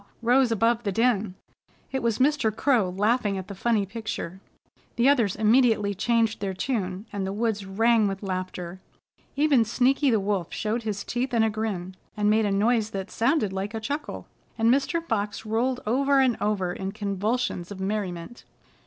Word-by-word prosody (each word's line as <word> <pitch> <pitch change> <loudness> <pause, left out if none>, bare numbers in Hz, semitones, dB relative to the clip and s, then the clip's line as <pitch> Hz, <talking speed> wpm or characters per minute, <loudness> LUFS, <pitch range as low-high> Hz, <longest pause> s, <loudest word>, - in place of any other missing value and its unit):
rose 245 +1 +4
above 230 +2 +2
the 205 -4 -2
din. 215 -3 +1 0.6
It 265 - -2
was 230 -2 0
Mr. 270 -4 +2
Crow 225 -3 +2
laughing 205 +2 +1
at 190 - -6
the 200 - -7
funny 210 +1 +1
picture. 195 -3 -6 0.5
The 240 +2 +3
others 235 -9 +3
immediately 220 -2 +3
changed 225 +2 +1
their 195 -2 -3
tune, 190 -3 -2
and 200 -1 -2
the 190 - -2
woods 210 -1 -2
rang 225 +2 +3
with 195 +1 -4
laughter. 185 -1 -4 0.6
Even 285 -4 +4
Sneaky 265 +5 +2
the 225 -3 +3
Wolf 195 -4 -2
showed 225 +2 -2
his 210 -3 -3
teeth 245 +1 -2
in 225 - +4
a 220 - +2
grin, 205 -4 -3 0.2
and 210 0 +2
made 220 0 +3
a - - 0
noise 215 +2 +2
that 195 -1 -5
sounded 230 -4 +1
like 195 +3 -4
a - - -2
chuckle 285 +7 -4 0.3
and 230 +1 +4
Mr. 330 +5 0
Fox 210 -4 -2
rolled 245 +4 0
over 275 +5 +2
and 255 -3 +3
over 195 -4 0
in 190 +1 -5
convulsions 205 -1 -2
of 200 -2 -8
merriment. 190 +1 -4
220 Hz, 175 wpm, -26 LUFS, 195-240 Hz, 0.6 s, rose